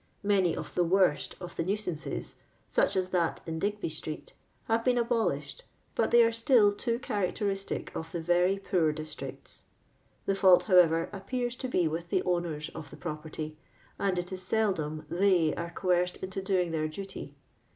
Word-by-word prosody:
Many 195 Hz, -4 st, +3 dB
of -, -, -6 dB
the 180 Hz, -, +2 dB
worst 180 Hz, -3 st, +2 dB
of 175 Hz, -1 st, -8 dB
the -, -, -1 dB
nuisances 185 Hz, -4 st, -3 dB, 0.3 s
(sueh -, -, +3 dB
ss 185 Hz, -1 st, 0 dB
that 175 Hz, -3 st, +1 dB
in 160 Hz, -1 st, -4 dB
Digby 205 Hz, +3 st, -1 dB
street) 155 Hz, 0 st, -7 dB, 0.3 s
ham 225 Hz, 0 st, +2 dB
been 250 Hz, 0 st, +3 dB
abolished, 235 Hz, -, 0 dB, 0.3 s
hut -, -, +2 dB
they 235 Hz, 0 st, +7 dB
are 230 Hz, -, +3 dB
still 230 Hz, -2 st, +4 dB
too 230 Hz, +3 st, -1 dB
characteristic 205 Hz, -4 st, -2 dB
of 160 Hz, 0 st, -5 dB
the 170 Hz, -, -3 dB
very 175 Hz, +3 st, +2 dB
poor 180 Hz, -5 st, +1 dB
districts. 155 Hz, 0 st, -7 dB, 0.6 s
The 195 Hz, -, +2 dB
fault, 190 Hz, -2 st, +6 dB
however, 170 Hz, -4 st, +5 dB
appears 240 Hz, +5 st, -3 dB
to 260 Hz, -, -3 dB
be 180 Hz, -9 st, +2 dB
with 165 Hz, +2 st, -4 dB
the -, -, +1 dB
owners 170 Hz, -4 st, -1 dB
of 160 Hz, -2 st, -10 dB
property, 155 Hz, -1 st, -6 dB, 0.4 s
and 195 Hz, -2 st, +1 dB
it 175 Hz, +1 st, -3 dB
is 185 Hz, -1 st, -5 dB
seldom 180 Hz, -7 st, 0 dB
theg 175 Hz, -3 st, +3 dB
are 170 Hz, 0 st, -4 dB
coerced 180 Hz, 0 st, +1 dB
into 190 Hz, +1 st, -5 dB
doing 185 Hz, -3 st, +1 dB
their 155 Hz, -1 st, 0 dB
duty. 190 Hz, +5 st, -7 dB
185 Hz, 165 wpm, -30 LUFS, 165-205 Hz, 0.6 s, they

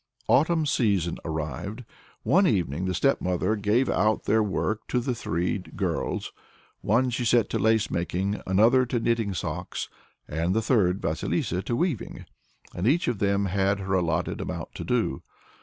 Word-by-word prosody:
The -, -, +3 dB
autumn 160 Hz, +2 st, +3 dB
season 100 Hz, -, +1 dB
arrived. 80 Hz, -, -4 dB, 0.4 s
One 190 Hz, +2 st, +4 dB
evening 90 Hz, -, 0 dB
the 90 Hz, -1 st, -1 dB
stepmother 90 Hz, -5 st, +1 dB
gave 105 Hz, +5 st, +1 dB
out 110 Hz, 0 st, +1 dB
their 110 Hz, +1 st, +3 dB
work 110 Hz, +1 st, -2 dB
to 125 Hz, -, +1 dB
the 125 Hz, +1 st, -1 dB
three 90 Hz, -4 st, -1 dB
girls; 85 Hz, -3 st, -3 dB, 0.5 s
one 125 Hz, +5 st, +2 dB
she 125 Hz, +1 st, -2 dB
set 120 Hz, -1 st, +3 dB
to -, -, 0 dB
lace 110 Hz, +1 st, +2 dB
making, 95 Hz, +4 st, -1 dB
another 110 Hz, +7 st, +4 dB
to 120 Hz, -, 0 dB
knitting 115 Hz, -4 st, 0 dB
socks, 85 Hz, +1 st, -4 dB, 0.4 s
and 85 Hz, +5 st, -1 dB
the 110 Hz, -, +2 dB
third, 100 Hz, -6 st, +2 dB
Vasilissa, 85 Hz, +2 st, -1 dB
to 120 Hz, -, -2 dB
weaving; 165 Hz, -, -2 dB, 0.5 s
and 90 Hz, +5 st, -1 dB
each 160 Hz, +7 st, +2 dB
of 120 Hz, -5 st, -1 dB
them 100 Hz, -1 st, +1 dB
had 100 Hz, +1 st, +1 dB
her 95 Hz, 0 st, -2 dB
allotted 85 Hz, -3 st, 0 dB
amount -, -, -5 dB
to -, -, -6 dB
do. 65 Hz, -, 0 dB
100 Hz, 160 wpm, -26 LUFS, 90-120 Hz, 0.5 s, One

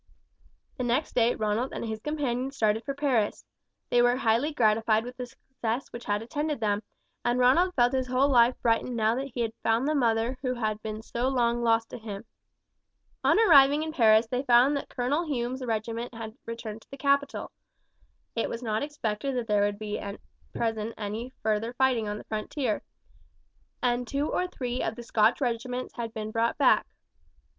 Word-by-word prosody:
The 255 Hz, -, -2 dB
next 245 Hz, +5 st, 0 dB
day 235 Hz, 0 st, +3 dB
Ronald 215 Hz, +4 st, -1 dB
and -, -, -4 dB
his 220 Hz, -1 st, -4 dB
companion 270 Hz, -2 st, -2 dB
started 225 Hz, -4 st, 0 dB
for 275 Hz, -, -3 dB
Paris. 260 Hz, -8 st, 0 dB, 0.5 s
They 240 Hz, -, +5 dB
were 245 Hz, 0 st, +4 dB
highly 240 Hz, +4 st, +1 dB
gratified 220 Hz, -4 st, +2 dB
with 245 Hz, 0 st, -8 dB
the 250 Hz, -1 st, -6 dB
success 245 Hz, 0 st, -5 dB
which 235 Hz, -, -8 dB
had 205 Hz, +1 st, -1 dB
attended 295 Hz, +3 st, -2 dB
them, 210 Hz, -2 st, 0 dB, 0.4 s
and 240 Hz, +1 st, +1 dB
Ronald 305 Hz, +9 st, +4 dB
felt 245 Hz, 0 st, +3 dB
his 260 Hz, -1 st, 0 dB
whole 255 Hz, +2 st, +3 dB
life 245 Hz, -2 st, +4 dB
brightened 235 Hz, +1 st, +1 dB
now 220 Hz, -1 st, +2 dB
that 265 Hz, +3 st, -3 dB
he 245 Hz, -, -1 dB
had 225 Hz, -1 st, -1 dB
found 230 Hz, +4 st, +1 dB
the 305 Hz, -, +2 dB
mother 240 Hz, -2 st, +1 dB
who 255 Hz, -2 st, -1 dB
had 215 Hz, -2 st, -2 dB
been 215 Hz, 0 st, -5 dB
so 240 Hz, +3 st, -2 dB
long 240 Hz, -2 st, +1 dB
lost 225 Hz, -1 st, +2 dB
to -, -, -7 dB
him. 215 Hz, -1 st, -7 dB, 1.0 s
On -, -, +4 dB
arriving 300 Hz, -7 st, +6 dB
at 315 Hz, -, -5 dB
Paris 220 Hz, -4 st, +5 dB
they 250 Hz, +3 st, -2 dB
found 255 Hz, +2 st, +5 dB
that 280 Hz, -, -4 dB
Colonel 285 Hz, +7 st, -1 dB
Hume's 255 Hz, -2 st, -2 dB
regiment 230 Hz, +1 st, -3 dB
had 225 Hz, -1 st, -7 dB
returned 230 Hz, -1 st, -6 dB
to -, -, -23 dB
the 275 Hz, -, -9 dB
capital. 280 Hz, 0 st, 0 dB, 0.8 s
It 230 Hz, -, 0 dB
was 230 Hz, +2 st, -5 dB
not 215 Hz, -2 st, -1 dB
expected 275 Hz, -3 st, -3 dB
that 245 Hz, -2 st, -1 dB
there 210 Hz, -2 st, +2 dB
would 205 Hz, 0 st, +1 dB, 0.2 s
at 200 Hz, 0 st, -6 dB, 0.3 s
present 225 Hz, -1 st, -2 dB
be -, -, -21 dB
any 220 Hz, +4 st, -4 dB
further 220 Hz, +2 st, 0 dB
fighting 250 Hz, -4 st, +2 dB
on 210 Hz, 0 st, -3 dB
the -, -, -9 dB
frontier, 215 Hz, +2 st, -2 dB, 1.0 s
and 245 Hz, 0 st, +1 dB
two 280 Hz, +4 st, -1 dB
or 365 Hz, -, 0 dB
three 250 Hz, -7 st, -4 dB
of 225 Hz, -, -2 dB
the 240 Hz, -, -8 dB
Scotch 220 Hz, -1 st, +3 dB
regiments 250 Hz, 0 st, -2 dB
had 230 Hz, -2 st, -5 dB
been 215 Hz, -1 st, -5 dB
brought 230 Hz, +1 st, 0 dB
back. -, -, +4 dB
240 Hz, 185 wpm, -28 LUFS, 220-260 Hz, 1.0 s, arriving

